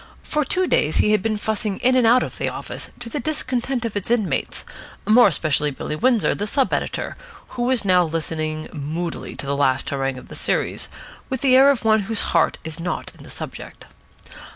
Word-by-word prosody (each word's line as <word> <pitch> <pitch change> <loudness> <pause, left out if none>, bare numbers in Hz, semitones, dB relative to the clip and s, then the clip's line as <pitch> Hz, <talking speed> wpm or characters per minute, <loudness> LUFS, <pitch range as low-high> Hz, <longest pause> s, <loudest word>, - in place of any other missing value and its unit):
For 300 0 0
two 370 +6 0
days 155 - +1
he 210 - +4
had 215 - +3
been 215 +1 -1
fussing 210 -1 -2
in 255 +1 +3
and 250 -3 +4
out 245 +2 +5
of - - -7
the - - 0
office, - - -6
to 240 - -5
the 260 +6 -4
discontent 260 -3 -2
of 225 - -4
its 205 0 -2
inmates, 230 -4 0 0.4
more 230 +2 +7
especially 150 -3 +1
Billy 145 +2 -5
Windsor, 240 +4 +2
the 205 - -3
sub 270 +3 +1
editor, - - -2 0.3
who 240 - -3
was 250 -4 +1
now 180 -2 +4
listening 155 -1 -3
moodily 160 +3 -4
to - - -7
the 140 +1 -1
last 135 -2 +1
harangue 135 -1 -1
of - - -11
the - - -11
series, - - -1 0.4
with 260 -2 -3
the 260 -2 +5
air 270 +2 +7
of 260 -5 +1
one 220 0 +5
whose 225 - +1
heart 165 - +3
is 160 0 -7
not 175 +1 -3
in - - -16
the - - -12
subject. - - -8
215 Hz, 205 wpm, -22 LUFS, 160-250 Hz, 0.4 s, more